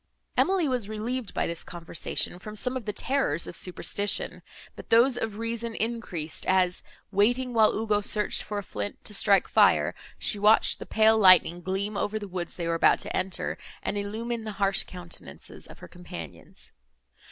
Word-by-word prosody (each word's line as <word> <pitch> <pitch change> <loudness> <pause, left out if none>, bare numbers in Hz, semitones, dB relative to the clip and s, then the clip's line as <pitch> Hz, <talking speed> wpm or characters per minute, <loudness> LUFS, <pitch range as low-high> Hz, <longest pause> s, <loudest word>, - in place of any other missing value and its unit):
Emily 375 -4 +2
was 245 -6 -1
relieved 225 +2 -4
by - - -1
this 170 -1 -4
conversation 175 +1 -3
from 210 +3 -9
some 250 +4 -2
of 255 -4 -4
the 210 - -1
terrors 210 - 0
of - - -6
superstition, 200 +2 0 0.3
but - - -11
those 240 +3 +5
of 225 -3 -3
reason 230 0 -3
increased, 210 -9 -3
as, 185 -1 +2 0.3
waiting 245 +5 +2
while 220 -2 +5
Ugo 210 -1 +1
searched 210 0 0
for 210 - -5
a 205 - -3
flint, 105 - -6
to 210 - -1
strike 200 -1 +4
fire, - - +4 0.2
she 210 - +2
watched 210 +2 +4
the - - -8
pale 220 0 +4
lightning 185 -3 +6
gleam 195 +3 -2
over 205 +1 -1
the 205 -1 -6
woods 180 -2 -5
they 170 - -4
were 170 - +1
about 165 - +4
to - - -4
enter, 185 -1 -2 0.2
and - - -2
illumine 220 +3 -3
the 215 -1 -5
harsh 195 -1 +1
countenances 175 -2 -10
of - - -13
her - - -11
companions. 130 - -9
205 Hz, 175 wpm, -27 LUFS, 185-225 Hz, 0.3 s, lightning